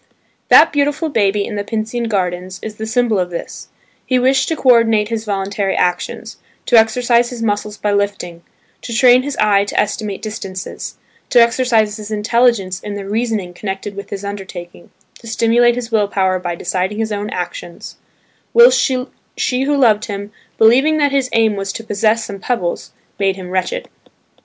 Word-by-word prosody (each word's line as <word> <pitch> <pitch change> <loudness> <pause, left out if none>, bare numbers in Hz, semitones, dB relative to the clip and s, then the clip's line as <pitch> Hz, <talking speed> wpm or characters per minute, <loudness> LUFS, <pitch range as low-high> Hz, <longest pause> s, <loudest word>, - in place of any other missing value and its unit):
That 325 - +7
beautiful 290 +2 0
baby 205 -5 +1
in 210 - -5
the 205 - -2
Pincian 225 +3 -3
Gardens 185 -2 -2
is 215 -1 -7
the 220 - -5
symbol 225 -2 +1
of 180 -1 -1
this: 170 - -7 0.4
he 255 - +1
wished 260 +2 +2
to 325 - -1
co 260 -4 +4
ordinate 225 -3 +3
his 225 -1 -3
voluntary 200 -1 -2
actions; 180 0 -2 0.3
to 245 - +2
exercise 235 +1 +3
his 240 -2 -6
muscles 210 -1 -2
by 210 - -1
lifting; 200 -4 -2 0.4
to 235 - -5
train 250 0 +6
his 285 +1 -5
eye 205 -2 +3
to - - -2
estimate 210 -1 -2
distances; 195 -3 -6 0.3
to 245 - +5
exercise 235 -3 +2
his 210 -1 -8
intelligence 215 -3 +1
in 210 -1 -6
the 200 -1 -6
reasoning 215 -4 -2
connected 195 +1 -5
with 200 - -8
his 200 0 -6
undertaking; 190 -4 -8 0.3
to 230 - -13
stimulate 235 +2 +3
his 245 -1 -5
will 210 -2 +2
power 190 -2 0
by 175 -1 -4
deciding 185 +4 -2
his 220 0 -2
own 205 0 -3
actions; 175 -2 -6 0.6
whilst 475 +1 +7
she 255 -1 -2
who 285 +2 +1
loved 220 -5 +3
him, 205 0 -6 0.3
believing 265 +8 +4
that 290 -2 +2
his 270 -2 0
aim 225 -2 +2
was 195 -1 -3
to 225 - -7
possess 220 +1 0
some 200 -1 -7
pebbles, 190 -7 -3 0.3
made 195 -1 +1
him 185 -2 -9
wretched. 335 - -2
215 Hz, 175 wpm, -17 LUFS, 195-240 Hz, 0.6 s, That